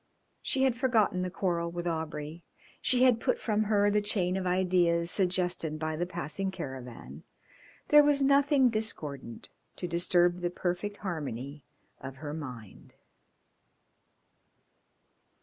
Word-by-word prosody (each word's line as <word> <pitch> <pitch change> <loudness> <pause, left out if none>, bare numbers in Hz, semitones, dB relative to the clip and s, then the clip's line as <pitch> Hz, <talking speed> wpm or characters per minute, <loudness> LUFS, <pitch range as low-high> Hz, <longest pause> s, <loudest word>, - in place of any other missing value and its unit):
She 265 - 0
had 260 -3 +3
forgotten 230 -7 +2
the 180 - -2
quarrel 170 -2 -1
with 175 0 -5
Aubrey. 160 -1 -4 0.4
She 255 0 +2
had 250 -3 +5
put 255 - 0
from 215 -1 0
her 205 -1 +3
the 210 0 +2
chain 190 -3 0
of 190 -1 -2
ideas 180 -2 +2
suggested 180 -4 0
by 155 0 -3
the 175 +3 -2
passing 175 +1 -2
caravan. 125 - -8 0.7
There 295 0 +8
was 290 -1 +3
nothing 280 -1 +4
discordant 155 - -4 0.3
to 180 - -4
disturb 175 +1 +2
the 175 0 -1
perfect 180 +3 -3
harmony 145 -5 -5 0.3
of 135 0 -8
her 145 +1 -6
mind. 125 -9 -9
175 Hz, 130 wpm, -29 LUFS, 155-205 Hz, 0.7 s, There